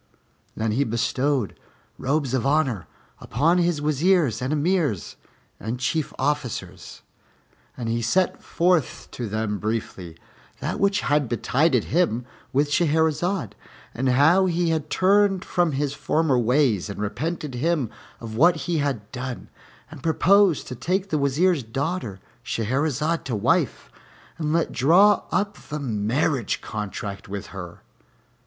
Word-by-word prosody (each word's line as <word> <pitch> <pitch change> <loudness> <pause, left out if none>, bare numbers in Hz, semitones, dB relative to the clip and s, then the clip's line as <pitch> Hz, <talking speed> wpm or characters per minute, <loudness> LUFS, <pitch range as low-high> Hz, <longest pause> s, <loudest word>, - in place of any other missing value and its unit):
Then 110 0 -1
he 130 +6 +2
bestowed 125 +1 -1 0.4
robes 140 -1 0
of 130 - +1
honor 135 - +1 0.3
upon 165 +9 +1
his 170 -4 +1
Wazirs 150 - +2
and 130 +2 -2
Emirs 155 - 0 0.4
and 115 +3 -4
Chief 155 +4 -1
Officers 125 -10 -3 0.7
and 120 - -4
he 115 +1 0
set 180 +11 +1
forth 175 -3 0
to 120 -4 -5
them 105 -1 -2
briefly 100 -6 -4 0.4
that - - -3
which 200 +1 +2
had 145 -3 +1
betided 125 +3 +2
him 140 -9 0 0.3
with 145 +2 +1
Shahrazad, 160 - +1 0.4
and 130 +2 0
how 160 +9 +5
he 170 -1 +1
had 155 -2 -2
turned 195 0 +3
from 175 -4 +1
his 140 0 -1
former 145 -2 +1
ways 120 - +2
and 100 - -6
repented 150 +7 -3
him 140 -2 0 0.3
of 110 -2 -7
what 170 +8 +5
he 170 -3 0
had 130 -8 -2
done, 125 -1 -6 0.4
and - - -10
proposed 185 +1 +3
to 125 - -5
take 185 - -1
the 155 - +1
Wazir's 145 +4 +2
daughter 125 - -3 0.2
Shahrazad 145 +7 -1
to 125 - -2
wife, 100 - 0 0.5
and 150 -2 -1
let 165 +1 +1
draw 185 +10 +4
up 205 +2 -1
the 150 +1 -3
marriage 120 +1 0
contract 100 -1 -6
with 100 -1 -5
her. 90 -3 -9
140 Hz, 135 wpm, -24 LUFS, 115-165 Hz, 0.7 s, how